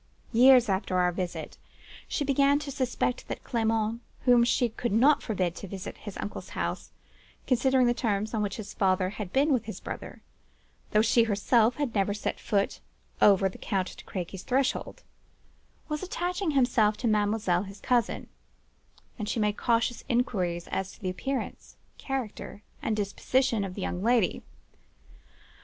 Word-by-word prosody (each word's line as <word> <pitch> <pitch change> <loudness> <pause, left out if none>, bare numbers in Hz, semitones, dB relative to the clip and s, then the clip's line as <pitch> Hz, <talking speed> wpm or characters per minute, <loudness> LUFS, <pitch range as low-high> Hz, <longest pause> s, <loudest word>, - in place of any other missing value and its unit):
Years 250 +1 +7
after 190 -1 0
our 180 0 +3
visit, 180 0 -5 0.5
she 290 - -1
began 280 +1 +4
to 290 -1 -5
suspect 255 -2 -1
that - - -5
Clement 225 0 0 0.2
(whom 245 -2 +5
she 240 +1 +2
could 235 +1 -3
not 260 +8 +5
forbid 185 -6 -1
to 200 - -7
visit 190 +1 -6
at - - -21
his 205 -3 -7
uncle's 205 - -6
house, - - -3 0.5
considering 260 0 +3
the 240 - +3
terms 215 -3 -1
on 220 - 0
which 200 -2 -2
his 215 -3 -7
father 185 -1 +1
had 210 -3 -6
been 285 +2 +3
with 235 -4 0
his 220 - -6
brother; - - -8 0.7
though 210 +1 +3
she 230 0 +4
herself 225 +3 +2 0.2
never 200 0 +1
set 210 - -3
foot 200 -1 0 0.4
over 195 -1 +6
the 190 - -8
Count 190 -2 -2
de - - -12
Crequy's 185 0 -5
threshold) 260 +4 -1 0.8
was 300 -1 -3
attaching 360 0 -2
himself 225 -5 +3
to 240 - -1
mademoiselle, 210 -4 +2
his 200 0 -9
cousin; 245 -2 0 0.9
and 210 -1 -3
she 230 - -1
made 210 -1 +1
cautious 235 0 0
inquiries 185 -9 0
as 190 0 -3
to - - -17
the 185 -2 -2
appearance, 270 +8 -4 0.2
character, 250 -6 -5 0.2
and 220 - 0
disposition 225 +3 +1
of 185 -2 -5
the 200 - -5
young 180 - -3
lady. 230 -3 +2
220 Hz, 160 wpm, -28 LUFS, 195-250 Hz, 0.9 s, Years